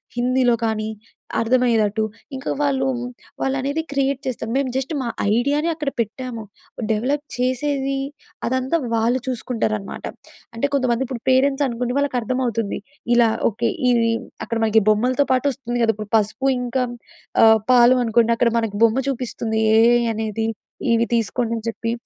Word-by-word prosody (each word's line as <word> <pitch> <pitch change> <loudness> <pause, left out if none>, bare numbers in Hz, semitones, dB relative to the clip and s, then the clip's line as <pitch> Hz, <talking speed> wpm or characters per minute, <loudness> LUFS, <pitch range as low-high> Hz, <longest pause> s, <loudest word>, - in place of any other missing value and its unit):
హిందీలో 250 0 +2
కానీ, 215 -1 -2 0.5
అర్థమయ్యేదట్టు. 225 -3 +2 0.3
ఇంక 265 - -8 0.2
వాళ్ళు 270 -2 +1 0.6
వాళ్ళనేది 275 +3 -1
క్రియేట్ 275 -1 0
చేస్తాం. 240 -3 -3
మేము 275 -2 0
జస్ట్ 265 +3 -2
మా 245 - -3 0.3
ఐడియానే 285 +7 +1
అక్కడ 300 -3 -2
పెట్టాము. 230 +1 -3 0.5
డెవలప్ 270 +7 0
చేసేవి, 270 +2 -1 0.5
అదంతా 260 +5 0 0.2
వాళ్ళు 235 +3 +2
చూసుకుంటారనమాట. 220 -5 -3 0.5
అంటే 230 +4 -1
కొంతమందిప్పుడు 255 -1 -1
పేరెంట్స్ 270 +2 +3
అనుకొండి 245 +1 -2
వాళ్ళకర్థమవుతుంది. 245 -5 -1 0.4
ఇలా 235 -1 +5 0.2
ఓకే. 230 +2 -1 0.2
ఇవి 230 -2 +3 0.3
అక్కడ 230 - -2
మనకి 220 0 +4
బొమ్మలతో 250 +6 +2
పాటొస్తుంది 255 -2 -1
కదా! 225 - +3
ఇప్పుడు 215 -1 -8
పసుపు, 215 +6 -1
ఇంక 250 0 -1 0.5
ఆహ్, 220 0 +7
పాలు 245 +1 +6
అనుకోండి. 230 0 +3
అక్కడ 235 -1 +3
మనకు 220 -3 -3
బొమ్మ 225 +3 +1
చూపిస్తుంది 230 -3 -2 0.2
ఏఐ 235 +2 +5
అనేది, 220 0 -2 0.5
ఇవి 230 0 +3
తీసుకోండి 230 +1 -1
అని 220 - -8
చెప్పి. 230 0 -3
245 Hz, 130 wpm, -21 LUFS, 225-265 Hz, 0.6 s, ఆహ్